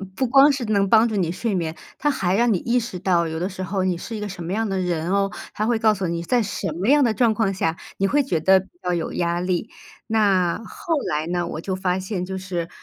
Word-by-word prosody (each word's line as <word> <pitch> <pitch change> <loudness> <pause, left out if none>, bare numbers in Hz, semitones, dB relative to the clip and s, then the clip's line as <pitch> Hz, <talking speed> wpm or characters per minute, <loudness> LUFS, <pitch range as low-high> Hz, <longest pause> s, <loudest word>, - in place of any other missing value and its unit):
不 260 - 0
光 275 +4 +6
是 275 -2 -2
能 200 -2 +2
帮 225 +3 +5
助 220 - -3
你 175 -5 0
睡 200 +4 -2
眠， 165 -3 -2 0.2
它 295 +1 +1
还 190 -8 0
让 235 +1 +3
你 185 - 0
意 245 +5 +1
识 225 -6 -6
到 170 -3 +2
有 160 0 -4
的 180 +3 -1
时 190 0 -6
候 190 0 -1
你 185 -2 0
是 225 +6 -6
一 - - -4
个 210 0 -4
什 180 -2 -7
么 170 +3 -3
样 220 +1 -1
的 195 - -1
人 175 -2 -1
哦， 195 0 +1 0.2
它 215 - 0
会 230 0 +1
告 220 -1 +4
诉 195 -1 -3
你， 170 0 -2
在 235 +7 +1
什 205 -1 -3
么 185 +6 -3
样 290 0 +6
的 230 -3 +2
状 235 -1 +3
况 220 -3 +1
下， 165 -4 -1 0.2
你 195 - +2
会 290 +8 +3
觉 185 - -1
得 190 +4 +5
比 190 - -11 0.2
较 180 - 0
有 170 -2 -2
压 170 0 0
力。 180 +4 -2 0.3
那 200 -4 +2
后 330 - -4 0.2
来 150 +1 -1
呢， 175 0 -1
我 160 - -5
就 190 - -3
发 185 -1 0
现 190 -1 -3
就 190 +1 -5
是 180 -3 -4
190 Hz, 290 characters per minute, -22 LUFS, 175-220 Hz, 0.3 s, 光